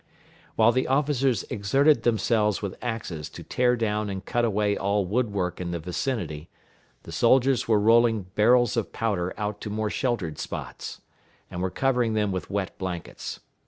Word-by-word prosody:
While 110 Hz, +1 st, +5 dB
the 130 Hz, +2 st, 0 dB
officers 135 Hz, -4 st, +1 dB
exerted 135 Hz, +7 st, +3 dB
themselves 110 Hz, -2 st, +2 dB
with 100 Hz, -2 st, -4 dB
axes 110 Hz, -11 st, -4 dB
to -, -, -10 dB
tear 125 Hz, 0 st, +2 dB
down 105 Hz, -2 st, -1 dB
and 95 Hz, 0 st, -5 dB
cut 120 Hz, -, 0 dB
away 105 Hz, -2 st, +1 dB
all 100 Hz, +1 st, +1 dB
the 90 Hz, -, -7 dB
wood 120 Hz, -1 st, +1 dB
work 90 Hz, -3 st, -2 dB
in 90 Hz, -, -3 dB
the 85 Hz, -, -2 dB
vicinity, 85 Hz, -, -3 dB, 0.5 s
the -, -, -10 dB
soldiers 130 Hz, 0 st, +3 dB
were 110 Hz, -2 st, +4 dB
rolling 115 Hz, 0 st, +4 dB
barrels 120 Hz, +2 st, +4 dB
of 115 Hz, -3 st, -1 dB
powder 100 Hz, -6 st, -1 dB
out 105 Hz, -1 st, -3 dB
to 105 Hz, -, -5 dB
more 105 Hz, 0 st, -2 dB
sheltered 105 Hz, -, -2 dB
spots, -, -, -6 dB, 0.5 s
and 90 Hz, -, -4 dB
were 95 Hz, -, 0 dB
covering 125 Hz, 0 st, +1 dB
them 105 Hz, -2 st, +1 dB
with 95 Hz, -1 st, -4 dB
wet 100 Hz, -1 st, -2 dB
blankets. 90 Hz, -3 st, -5 dB
105 Hz, 170 wpm, -26 LUFS, 95-120 Hz, 0.5 s, While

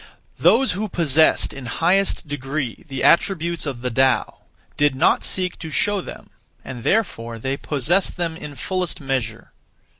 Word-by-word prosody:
1. -, -, -14 dB
(Those 265 Hz, +3 st, +5 dB
who) 205 Hz, +4 st, -3 dB
possessed 160 Hz, -3 st, +3 dB
in 135 Hz, -3 st, -8 dB
highest 180 Hz, +6 st, +1 dB
degree 140 Hz, 0 st, -4 dB
the 135 Hz, -2 st, -4 dB
attributes 170 Hz, -2 st, +2 dB
(of 130 Hz, -4 st, -5 dB
the 125 Hz, -, -1 dB
Tao) 130 Hz, -1 st, +1 dB, 0.4 s
did 145 Hz, -2 st, +2 dB
not 130 Hz, -, +3 dB
(seek) 185 Hz, -1 st, 0 dB
to 160 Hz, -, -6 dB
show 205 Hz, +6 st, 0 dB
them, -, -, -11 dB, 0.3 s
and 125 Hz, -2 st, -7 dB
therefore 115 Hz, -, -1 dB
they 135 Hz, +4 st, -2 dB
possessed 155 Hz, +9 st, 0 dB
them 170 Hz, -2 st, -2 dB
(in 150 Hz, -3 st, -8 dB
fullest 180 Hz, +5 st, -3 dB
measure). 125 Hz, -5 st, -3 dB
150 Hz, 155 wpm, -21 LUFS, 130-180 Hz, 0.4 s, Those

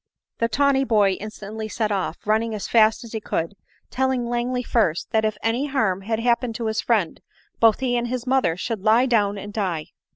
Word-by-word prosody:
The 230 Hz, -, +2 dB
tawny 275 Hz, +3 st, +2 dB
boy 210 Hz, -6 st, +3 dB
instantly 215 Hz, +1 st, -7 dB
set 215 Hz, 0 st, -2 dB
off, 190 Hz, -4 st, -2 dB
running 220 Hz, +1 st, +1 dB
as 205 Hz, -, -5 dB
fast 220 Hz, 0 st, +4 dB
as 230 Hz, -, -11 dB
he 220 Hz, -, -4 dB
could, 165 Hz, -2 st, -2 dB, 0.4 s
telling 260 Hz, -1 st, 0 dB
Langley 240 Hz, +1 st, -1 dB
first, 205 Hz, -10 st, 0 dB
that 220 Hz, -1 st, +2 dB
if 215 Hz, -1 st, -1 dB
any 240 Hz, +6 st, 0 dB
harm 220 Hz, -9 st, 0 dB
had 220 Hz, +3 st, -2 dB
happened 235 Hz, 0 st, +1 dB
to 230 Hz, -, -4 dB
his 220 Hz, 0 st, 0 dB
friend, 210 Hz, -9 st, 0 dB, 0.4 s
both 225 Hz, +2 st, +4 dB
he 250 Hz, -2 st, 0 dB
and 240 Hz, 0 st, 0 dB
his 250 Hz, 0 st, -3 dB
mother 255 Hz, -11 st, +1 dB
should 225 Hz, +1 st, -3 dB
lie 220 Hz, +5 st, +4 dB
down 205 Hz, -5 st, +1 dB
and 205 Hz, +1 st, -8 dB
die. 180 Hz, -8 st, -2 dB
225 Hz, 200 wpm, -23 LUFS, 205-240 Hz, 0.4 s, fast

